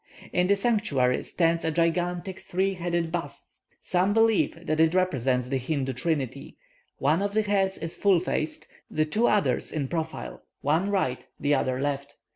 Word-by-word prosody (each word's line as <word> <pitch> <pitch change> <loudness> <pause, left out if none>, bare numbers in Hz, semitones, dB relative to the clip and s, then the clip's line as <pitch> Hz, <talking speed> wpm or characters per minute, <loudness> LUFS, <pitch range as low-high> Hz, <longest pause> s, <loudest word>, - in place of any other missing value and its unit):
In 180 0 +2
the 200 - +4
sanctuary 195 - +1
stands 165 -1 +1
a 160 - +1
gigantic 175 +3 0
three 190 +2 -1
headed 170 -2 -2
bust. 175 -1 -6 0.2
Some 185 +2 +1
believe 225 -6 +2
that 155 0 0
it 160 +2 +4
represents 130 -9 +1
the 135 -1 0
Hindoo 135 0 -2
Trinity; 140 -1 -2 0.4
one 150 +6 +2
of 200 +1 -2
the 220 - +3
heads 195 -2 +1
is 165 0 -5
full 195 -4 +4
faced, 160 -2 -3 0.2
the 155 - +1
two 215 +10 +1
others 170 -12 +1
in 145 -4 -2
profile, 160 +1 -4 0.2
one 160 +8 +1
right, 185 -11 -1
the 145 +1 +2
other 130 -2 0
left. 140 0 -3
165 Hz, 165 wpm, -26 LUFS, 140-190 Hz, 0.4 s, the